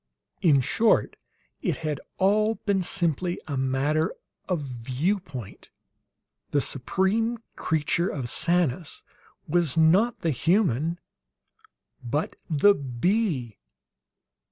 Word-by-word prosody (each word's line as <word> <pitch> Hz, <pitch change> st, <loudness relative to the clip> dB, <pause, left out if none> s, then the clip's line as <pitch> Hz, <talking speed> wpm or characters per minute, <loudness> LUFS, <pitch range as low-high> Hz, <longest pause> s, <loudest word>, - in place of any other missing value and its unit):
In 145 Hz, -6 st, +5 dB
short, 225 Hz, -, +2 dB, 0.5 s
it -, -, -1 dB
had 150 Hz, -2 st, -2 dB, 0.2 s
all 215 Hz, +3 st, +3 dB
been 200 Hz, -3 st, 0 dB
simply 175 Hz, -1 st, 0 dB
a 145 Hz, -, -3 dB
matter 135 Hz, +4 st, 0 dB, 0.3 s
of 180 Hz, -4 st, 0 dB
view 130 Hz, -, -1 dB
point. 130 Hz, -, -10 dB, 0.8 s
The 145 Hz, -, +2 dB
supreme 190 Hz, -, 0 dB, 0.2 s
creature 160 Hz, +3 st, 0 dB
of 135 Hz, -5 st, -4 dB
Sanus 170 Hz, +1 st, 0 dB, 0.4 s
was, 165 Hz, -3 st, +1 dB
not 185 Hz, +9 st, +4 dB
the 165 Hz, -, +1 dB
human, 165 Hz, -, +1 dB, 1.0 s
but 145 Hz, +6 st, -2 dB
the 165 Hz, +6 st, +5 dB
bee. 140 Hz, -, -1 dB
160 Hz, 100 wpm, -26 LUFS, 135-190 Hz, 1.0 s, In